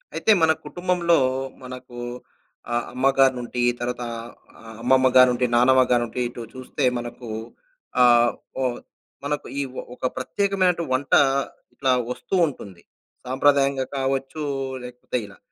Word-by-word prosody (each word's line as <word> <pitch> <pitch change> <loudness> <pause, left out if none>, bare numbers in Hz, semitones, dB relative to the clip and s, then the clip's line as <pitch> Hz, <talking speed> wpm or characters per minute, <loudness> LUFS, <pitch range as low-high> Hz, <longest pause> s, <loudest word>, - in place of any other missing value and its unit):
అయితే 220 - +2
మన‌ 160 0 +5
కుటుంబంలో, 175 -1 +1 0.5
మనకు 125 -1 -9 0.7
ఆహ్, 120 0 0
అమ్మగారి 135 +1 +3
నుండి 120 0 -4 0.2
తరువాత 120 0 -3 0.6
ఆహ్, 110 -1 -11
అమ్మమ్మ 130 +2 +4
గానుండి, 125 -1 +5
నానమ్మ 130 +2 +5
గానుండి 120 0 +1
ఇటు 120 - -9
చూస్తే 130 +2 -5
మనకు 120 0 -7 0.7
ఆహ్, 120 -1 +5 0.3
ఓహ్! 125 -2 -1 0.5
మనకు 145 0 -2
ఇ - - +1 0.3
ఒక 130 - -5
ప్రత్యేకమైనటు 185 +4 +1
వంట 135 +2 -1 0.6
ఇట్లా 135 -1 0 0.2
వస్తూ 160 - -4
ఉంటుంది. 100 - -9 0.5
సాంప్రదాయంగా 135 0 +2
కావచ్చు, 135 +3 -2 0.4
లేకపోతే 125 0 -5
ఇలా 100 -2 -14
130 Hz, 115 wpm, -23 LUFS, 120-140 Hz, 0.7 s, మన‌